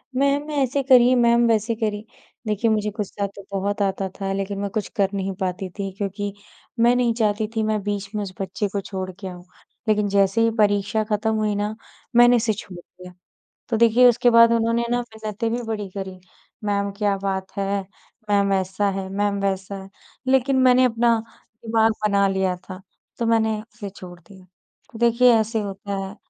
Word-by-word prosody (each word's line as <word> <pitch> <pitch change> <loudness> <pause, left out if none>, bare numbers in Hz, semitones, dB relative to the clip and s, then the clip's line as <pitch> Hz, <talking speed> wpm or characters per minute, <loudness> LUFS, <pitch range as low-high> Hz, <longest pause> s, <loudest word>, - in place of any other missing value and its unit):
Ma'am 280 +3 +1
ऐसे 280 -1 0
करिए, 255 -1 +6
ma'am 235 -1 +4
वैसे 225 0 +1
करिए। 215 -1 -3 0.4
देखिए 215 +2 +1
मुझे 210 -1 0
गुस्सा 205 -1 -3
तो 200 - -10
बहुत 200 +1 -2
आता 195 -1 0
था, 195 -1 -2
लेकिन 195 0 -3
मैं 200 - -2
कुछ 210 +1 -3
कर 195 -2 +2
नहीं 195 -1 -2
पाती 185 0 -2
थी, 195 -1 -3
क्योंकि 200 0 -3 0.5
मैं 240 +1 +5
नहीं 245 -2 +2
चाहती 215 -1 0
थी 220 - +1
मैं 215 -1 0
बीच 205 -1 -3
में 210 - -1
उस 185 -1 -7
बच्चे 200 +2 -2
को 200 - -1
छोड़ 190 -1 -5
के 195 - -6
आऊँ, 180 -1 -9 0.4
लेकिन 210 -1 +2
जैसे 200 +2 +2
ही 230 - +4
परीक्षा 205 +1 +2
खत्म 215 +1 -1
हुई 215 -1 0
ना, 210 +1 -2 0.4
मैंने 240 +1 +7
इसे 225 -1 +1
छोड़ 195 -3 -9
दिया। 180 +1 -14 0.6
तो 230 - +1
देखिए 235 +2 +6
उसके 245 +1 +3
बाद 230 0 +7
उन्होंने 230 +1 +1
ना 245 - +2
मिन्नतें 220 -1 -5
भी 240 +1 -2
बड़ी 215 -3 -4
करी, 190 -1 -7 0.5
मैम 200 -1 0
क्या 205 -2 +1
बात 190 -1 -2
है 200 0 -1 0.5
मैम 200 -1 +3
ऐसा 190 +1 0
है, 195 0 -4
मैम 200 0 -1
वैसा 195 0 -2
है 195 - -13 0.4
लेकिन 265 0 +3
मैंने 255 0 +5
अपना 235 -1 +2 0.5
दिमाग 225 0 +3 0.2
बना 200 -1 +3
लिया 190 -1 0
था, 185 0 -10 0.4
तो 235 - 0
मैंने 220 -1 +2
उसे 215 -2 -9
छोड़ 180 -2 -12
दिया। 185 +2 -17 0.5
देखिए 235 +1 +5
ऐसे 220 +1 -1
होता 200 0 -5
है, 195 - -10
210 Hz, 185 wpm, -22 LUFS, 195-230 Hz, 0.6 s, मैंने